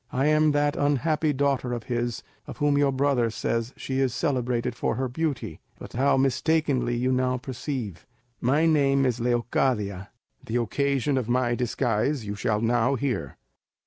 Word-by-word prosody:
I 130 Hz, +2 st, 0 dB
am 155 Hz, 0 st, +4 dB
that 145 Hz, 0 st, +1 dB
unhappy 150 Hz, +2 st, +1 dB
daughter 135 Hz, -3 st, 0 dB
of 120 Hz, -2 st, -4 dB
his 120 Hz, -1 st, -2 dB, 0.2 s
of -, -, -8 dB
whom 145 Hz, -1 st, +2 dB
your 140 Hz, -1 st, +3 dB
brother 130 Hz, -3 st, +1 dB
says 115 Hz, +1 st, -2 dB
that -, -, -25 dB
she 130 Hz, 0 st, -2 dB
is 130 Hz, -3 st, +1 dB
celebrated 125 Hz, -5 st, -1 dB
for 120 Hz, -, -1 dB
her 130 Hz, +2 st, -1 dB
beauty, 140 Hz, +1 st, -3 dB, 0.2 s
but -, -, -11 dB
how 135 Hz, +3 st, +2 dB
mistakenly 135 Hz, -1 st, +1 dB
you 125 Hz, +2 st, +1 dB
now 130 Hz, 0 st, +1 dB
perceive. 130 Hz, -, -5 dB, 0.3 s
My 145 Hz, +7 st, +2 dB
name 140 Hz, -4 st, +3 dB
is 125 Hz, -2 st, 0 dB
Leocadia; 115 Hz, -5 st, 0 dB, 0.3 s
the 115 Hz, -, -5 dB
occasion 140 Hz, +3 st, 0 dB
of 120 Hz, -2 st, -5 dB
my 120 Hz, -1 st, +2 dB
disguise 120 Hz, +1 st, 0 dB
you 100 Hz, -, -3 dB
shall 105 Hz, +1 st, -1 dB
now 120 Hz, +3 st, +2 dB
hear. 115 Hz, -, -3 dB
130 Hz, 165 wpm, -26 LUFS, 120-140 Hz, 0.3 s, am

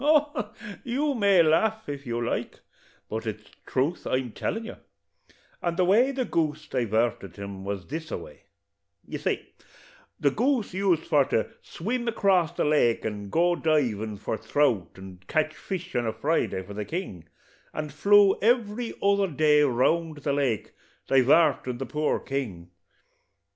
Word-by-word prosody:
Oh, 295 Hz, -7 st, +2 dB, 0.3 s
you 280 Hz, +4 st, 0 dB
may 200 Hz, -7 st, +5 dB
laugh, 220 Hz, +8 st, +2 dB
if 140 Hz, -2 st, -6 dB
you 120 Hz, 0 st, -2 dB
like, -, -, -3 dB, 0.5 s
but 110 Hz, +1 st, -4 dB
it's 105 Hz, -1 st, -6 dB, 0.2 s
truth 140 Hz, +7 st, -1 dB
I'm 130 Hz, -2 st, -1 dB
tellin' 225 Hz, -, -3 dB
you; -, -, -8 dB, 0.8 s
and 170 Hz, -1 st, -1 dB
the 185 Hz, -, +3 dB
way 225 Hz, +8 st, +4 dB
the 260 Hz, -2 st, -2 dB
goose 155 Hz, -4 st, -1 dB
divarted 115 Hz, -4 st, -1 dB
him 100 Hz, -1 st, -7 dB
was 100 Hz, -2 st, -4 dB
this 160 Hz, +2 st, -6 dB
a -, -, -3 dB
way: -, -, -13 dB, 0.6 s
You -, -, -6 dB
see, -, -, -3 dB, 0.7 s
the -, -, +3 dB
goose 255 Hz, -7 st, 0 dB
used 185 Hz, -4 st, +1 dB
for 145 Hz, -4 st, +3 dB
to 110 Hz, -, -1 dB
swim 235 Hz, +7 st, -3 dB
acrass 190 Hz, -7 st, +2 dB
the -, -, 0 dB
lake, 145 Hz, -6 st, +2 dB
and 105 Hz, -2 st, -4 dB
go 175 Hz, +5 st, +3 dB
divin' 115 Hz, -11 st, 0 dB
for 110 Hz, +2 st, -3 dB
throut, 115 Hz, -, 0 dB
and 95 Hz, -1 st, -12 dB
cotch 155 Hz, 0 st, +1 dB
fish 185 Hz, 0 st, -6 dB
on 120 Hz, -1 st, +1 dB
a 110 Hz, -, -1 dB
Friday 115 Hz, -5 st, 0 dB
for 100 Hz, +2 st, -10 dB
the 105 Hz, +1 st, -3 dB
king, 105 Hz, -, -5 dB, 0.5 s
and 150 Hz, -2 st, -5 dB
flew 200 Hz, +5 st, +5 dB
every 230 Hz, +1 st, +1 dB
other 200 Hz, 0 st, +3 dB
day 150 Hz, -2 st, +3 dB
round 150 Hz, +5 st, +2 dB
about 145 Hz, -, -13 dB
the 140 Hz, -, 0 dB
lake, 135 Hz, -6 st, -1 dB, 0.3 s
divartin' 135 Hz, -1 st, +3 dB
the 135 Hz, -, -4 dB
poor 150 Hz, +4 st, 0 dB
king. 100 Hz, -12 st, -5 dB
150 Hz, 160 wpm, -26 LUFS, 115-195 Hz, 0.8 s, may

